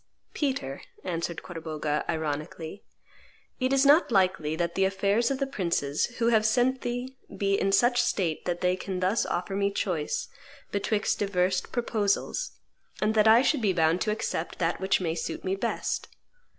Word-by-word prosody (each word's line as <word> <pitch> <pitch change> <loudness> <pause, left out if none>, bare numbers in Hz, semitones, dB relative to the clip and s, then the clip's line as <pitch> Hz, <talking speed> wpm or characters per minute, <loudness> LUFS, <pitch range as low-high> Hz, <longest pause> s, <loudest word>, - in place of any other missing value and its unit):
"Peter," 260 - -2 0.2
answered 170 -1 -3
Corbogha 155 -3 -3
ironically, 160 +3 -4 0.8
"it 255 0 +1
is 275 0 +4
not 290 0 +5
likely 185 -6 +2
that 170 +1 -1
the 195 - +1
affairs 200 +4 +2
of 275 - 0
the 275 - 0
princes 170 - 0
who 235 -1 +2
have 220 -2 +4
sent 245 +4 +2
thee 245 +2 -4 0.2
be 200 -1 +1
in 195 0 +2
such 240 +5 +4
state 190 -10 -1
that 175 -1 -2
they 180 0 +2
can 185 0 -4
thus 185 +5 +1
offer 180 +2 -2
me 200 0 +2
choice 180 -6 -2 0.4
betwixt 205 +1 0
divers 185 -2 +1
proposals, 235 - -1 0.5
and 215 +1 +1
that 215 0 +4
I 225 +3 +7
should 290 -2 +2
be 200 -4 +2
bound 165 0 +2
to 215 - 0
accept 170 -6 -3
that 170 +1 -1
which 190 0 +2
may 165 -3 0
suit 165 - -4
me 190 +1 0
best. 195 - -2
195 Hz, 165 wpm, -27 LUFS, 170-230 Hz, 0.8 s, I